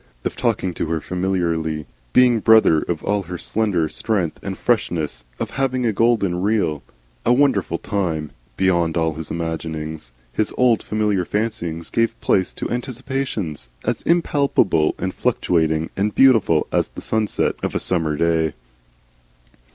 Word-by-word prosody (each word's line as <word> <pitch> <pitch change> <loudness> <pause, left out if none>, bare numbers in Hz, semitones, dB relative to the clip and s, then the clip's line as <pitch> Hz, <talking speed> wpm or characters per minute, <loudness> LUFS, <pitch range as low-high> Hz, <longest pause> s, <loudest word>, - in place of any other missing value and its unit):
Of - - -2
talking 90 -2 0
to 80 - -3
her 80 0 -1
familiarly, 85 -4 -1 0.3
being 125 -2 +5
brother 110 -8 +5
of 85 -3 -3
all 105 0 +1
her 90 -1 -6
slender 100 -5 0
strength 95 -3 -1
and 95 -1 -5
freshness, 80 - -1 0.2
of - - -3
having 130 -2 0
a 110 - +2
golden, 100 -5 +2
real, 100 -8 +1 0.4
and 125 - +3
wonderful 140 -1 +2
time 85 -7 -2 0.3
beyond 85 -3 +2
all 80 -1 +1
his 80 0 -7
imaginings. 80 -4 -4 0.2
His 110 - 0
old 125 -3 +4
familiar 105 -3 0
fancyings 85 -6 -3
gave 115 0 0
place 95 -1 +1
to - - -5
anticipations 125 - -3 0.2
as - - -1
impalpable 140 - +2
and 95 0 -3
fluctuating 80 -9 0
and 105 +2 -1
beautiful 115 - +5
as - - +1
the - - -10
sunset 110 -1 0
of - - -3
a - - +2
summer 80 -4 0
day. 80 -1 +1
95 Hz, 145 wpm, -21 LUFS, 80-110 Hz, 0.4 s, being